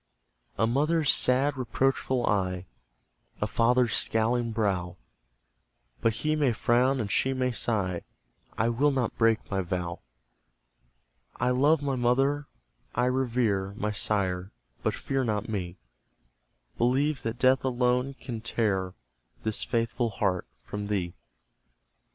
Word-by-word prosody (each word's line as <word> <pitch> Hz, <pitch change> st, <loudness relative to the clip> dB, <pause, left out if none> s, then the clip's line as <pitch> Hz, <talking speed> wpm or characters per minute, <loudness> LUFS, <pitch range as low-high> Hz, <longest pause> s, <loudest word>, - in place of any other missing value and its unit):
A 110 Hz, -, +3 dB
mother's 150 Hz, +5 st, +2 dB
sad 135 Hz, +3 st, +3 dB
reproachful 130 Hz, 0 st, 0 dB
eye, 90 Hz, -3 st, 0 dB, 0.7 s
A -, -, +1 dB
father's 120 Hz, +1 st, +2 dB
scowling 115 Hz, +1 st, +1 dB
brow 95 Hz, -5 st, -1 dB, 1.0 s
But 115 Hz, -, +3 dB
he 155 Hz, 0 st, +2 dB
may 145 Hz, -5 st, +2 dB
frown 125 Hz, +4 st, +2 dB
and 105 Hz, -4 st, -2 dB
she 130 Hz, +4 st, +2 dB
may 130 Hz, -1 st, 0 dB
sigh: 100 Hz, -7 st, -1 dB, 0.6 s
I 115 Hz, +2 st, +2 dB
will 130 Hz, +6 st, +2 dB
not 130 Hz, -5 st, -1 dB
break 115 Hz, -2 st, +1 dB
my 95 Hz, -1 st, +1 dB
vow! 90 Hz, -1 st, -3 dB, 1.4 s
I 125 Hz, -, +1 dB
love 145 Hz, +4 st, +3 dB
my 140 Hz, -2 st, 0 dB
mother, 135 Hz, +4 st, +1 dB, 0.5 s
I 125 Hz, -, +2 dB
revere 115 Hz, -7 st, 0 dB
My 105 Hz, 0 st, -1 dB
sire, 95 Hz, -2 st, -1 dB, 0.3 s
but -, -, 0 dB
fear 135 Hz, -1 st, -1 dB
not 105 Hz, -3 st, -1 dB
me 95 Hz, -4 st, -4 dB, 1.0 s
Believe 135 Hz, +5 st, +2 dB
that 115 Hz, +1 st, -3 dB
Death 130 Hz, +1 st, +3 dB
alone 125 Hz, +1 st, +1 dB
can 120 Hz, -4 st, -6 dB
tear 100 Hz, -5 st, -1 dB, 0.5 s
This 110 Hz, -1 st, 0 dB
faithful 115 Hz, +1 st, 0 dB
heart 95 Hz, -4 st, -1 dB, 0.2 s
from 105 Hz, +9 st, -5 dB
thee. 95 Hz, -5 st, -1 dB
115 Hz, 125 wpm, -28 LUFS, 105-130 Hz, 1.4 s, A